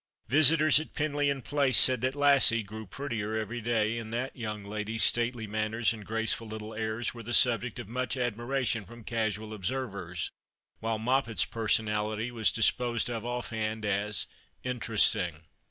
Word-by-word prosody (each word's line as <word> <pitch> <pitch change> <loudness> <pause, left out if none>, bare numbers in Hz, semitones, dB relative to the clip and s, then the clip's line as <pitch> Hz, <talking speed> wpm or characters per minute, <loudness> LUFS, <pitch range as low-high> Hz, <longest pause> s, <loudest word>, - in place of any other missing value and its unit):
Visitors 155 +1 +6
at 155 - -8
Penlyon 145 -3 0
Place 140 -5 +2
said 130 -2 +6
that 130 +2 0
Lassie 140 -5 +5
grew 110 +1 -9
prettier 110 -3 -4
every 115 +2 -4
day, 115 0 0
and 110 -1 -8
that 125 +3 -3
young 105 -4 -5
lady's 105 +2 -1
stately 120 0 +2
manners 110 +2 0
and 110 -2 -9
graceful 115 +1 -1
little 110 0 -7
airs 110 +1 -2
were 120 - -9
the 120 +1 0
subject 120 -1 +3
of 120 -4 -7
much 125 +4 -2
admira 125 +2 -2
tion 115 -2 0
from 120 +3 -13
casual 110 -1 -2
observers, 100 -6 -4 0.5
while 115 0 -1
Moppet's 115 -4 +1
personality 110 0 -1
was 115 -3 +1
disposed 120 +1 +1
of 115 0 -4
off 120 0 -4
hand 110 -1 -3
as 105 +1 0 0.2
" - - -39
interesting." 105 -9 +1
115 Hz, 160 wpm, -29 LUFS, 110-125 Hz, 0.5 s, Visitors